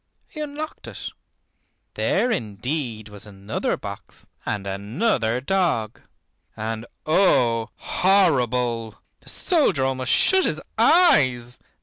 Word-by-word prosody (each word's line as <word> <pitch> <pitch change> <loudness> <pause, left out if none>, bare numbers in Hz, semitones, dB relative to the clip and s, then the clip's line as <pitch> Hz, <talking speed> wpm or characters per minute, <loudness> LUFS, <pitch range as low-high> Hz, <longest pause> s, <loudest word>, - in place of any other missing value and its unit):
He 305 - -11
unlocked 300 +1 -6
it. - - -6 0.8
There 250 - +1
indeed 115 - -3
was 105 0 -10
another 100 +1 -3
box - - -9 0.2
and 100 -2 -2
another 110 - -1
dog, 150 - 0 0.6
and 110 +1 -4 0.2
oh, 125 - +3
horrible! 125 - +1 0.2
the - - -7
soldier 240 - +2
almost 130 -1 -1
shut 380 0 +5
his - - 0 0.2
eyes. 130 - +4
125 Hz, 100 wpm, -23 LUFS, 110-185 Hz, 0.8 s, shut